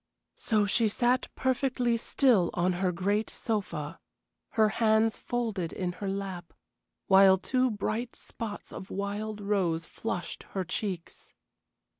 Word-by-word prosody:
So 215 Hz, -3 st, +2 dB
she 220 Hz, +3 st, +2 dB
sat 245 Hz, +4 st, +2 dB
perfectly 255 Hz, -2 st, +1 dB
still 230 Hz, -, +3 dB
on 180 Hz, +1 st, +2 dB
her 180 Hz, +1 st, 0 dB
great 200 Hz, +5 st, 0 dB
sofa, 170 Hz, -8 st, -3 dB, 0.5 s
her 220 Hz, -1 st, +4 dB
hands 220 Hz, 0 st, +2 dB
folded 220 Hz, -8 st, -2 dB
in 180 Hz, -2 st, -2 dB
her 200 Hz, -, -1 dB
lap, 190 Hz, -3 st, -5 dB, 0.5 s
while 190 Hz, 0 st, +7 dB
two 255 Hz, +6 st, +1 dB
bright 220 Hz, +3 st, -2 dB
spots 215 Hz, -3 st, -7 dB
of 190 Hz, -, -8 dB
wild 205 Hz, +2 st, -3 dB
rose 185 Hz, -5 st, 0 dB
flushed 175 Hz, -4 st, -4 dB, 0.2 s
her 190 Hz, -, +1 dB
cheeks. 185 Hz, -2 st, -5 dB
205 Hz, 125 wpm, -29 LUFS, 185-225 Hz, 0.5 s, while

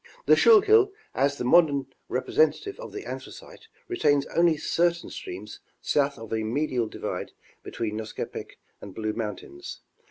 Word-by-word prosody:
The -, -, +7 dB
Schuylkill 430 Hz, -2 st, +6 dB, 0.2 s
as 140 Hz, +1 st, +1 dB
the -, -, -3 dB
modern 140 Hz, 0 st, +3 dB, 0.2 s
representative 425 Hz, -2 st, +1 dB
of -, -, -8 dB
the 405 Hz, -1 st, -7 dB
Anthracite 450 Hz, -, -9 dB, 0.2 s
retains 145 Hz, -, +2 dB
only 170 Hz, -2 st, +4 dB
certain 170 Hz, +3 st, 0 dB
streams 365 Hz, -2 st, -8 dB, 0.2 s
south 140 Hz, -1 st, +1 dB
of 115 Hz, -1 st, -8 dB
a 110 Hz, -, 0 dB
medial 125 Hz, +1 st, -1 dB
divide -, -, -5 dB, 0.3 s
between 110 Hz, -2 st, -4 dB
Nescopec 110 Hz, 0 st, -6 dB, 0.2 s
and 100 Hz, -2 st, -10 dB
Blue 110 Hz, -1 st, -2 dB
mountains. 120 Hz, -, -6 dB
145 Hz, 135 wpm, -26 LUFS, -, 0.3 s, The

